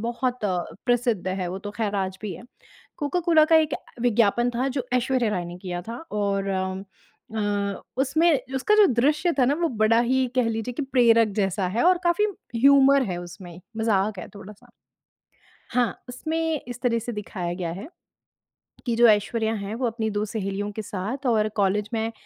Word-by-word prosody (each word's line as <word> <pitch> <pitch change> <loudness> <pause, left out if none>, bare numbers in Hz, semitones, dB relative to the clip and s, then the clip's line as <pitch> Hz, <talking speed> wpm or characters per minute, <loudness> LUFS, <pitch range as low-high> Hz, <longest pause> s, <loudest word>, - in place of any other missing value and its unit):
बहुत 240 +1 -2
अ, 185 -3 +1 0.3
प्रसिद्ध 240 -6 +1
है। 185 -1 -2
वो 185 - -4
तो 205 +1 -7
खैर 210 -1 -2
आज 190 -1 -2
भी 205 -3 -4
है। - - -11 0.6
कोका-कोला 320 +1 +3
का 325 +1 +5
एक 315 -1 +2 0.3
विज्ञापन 240 0 +2
था 245 +3 -1
जो 260 -2 -3
ऐश्वर्या 250 -2 +1
राय 180 -4 -2
ने 175 +1 -8
किया 175 -2 -5
था। 230 +5 -7
और 200 -1 -1
अम, 190 0 -2 0.5
म्म 205 -2 -1 0.3
उसमें 290 -1 +1
उसका 265 +11 +2
जो 420 - +7
दृश्य 300 +8 +2
था 255 - +5
ना 275 - +2
वो 335 - +2
बड़ा 225 -2 +2
ही 255 +2 +2
कह 250 - +4
लीजिए 225 +2 -3
कि 295 - -2
प्रेरक 235 -4 +4
जैसा 195 -1 0
है 215 +6 0
और 360 0 +5
काफ़ी 345 +4 +3 0.3
ह्यूमर 275 +2 +6
है 180 -3 -3
उसमें, 175 0 -10 0.2
मज़ाक 215 -2 +1
है 180 - -7
थोड़ा-सा। 210 +4 -12 1.1
हाँ, 245 -2 0
उसमें 320 +4 -2
इस 245 -1 -7
तरह 235 -2 +1
से 230 +2 -5
दिखाया 190 -5 -4
गया 175 -2 -3
है 195 - -8 1.0
कि 240 -2 0
जो 240 +1 +6
ऐश्वर्या 220 +1 +2
हैं 200 +1 -5
वो 245 +1 -1
अपनी 225 -1 -2
2 205 0 -1
सहेलियों 205 -1 -3
के 220 +1 -5
साथ 210 +8 -5
और 215 -2 +2
कॉलेज 205 +1 +1
में 225 0 -1
225 Hz, 185 wpm, -24 LUFS, 200-255 Hz, 1.1 s, जो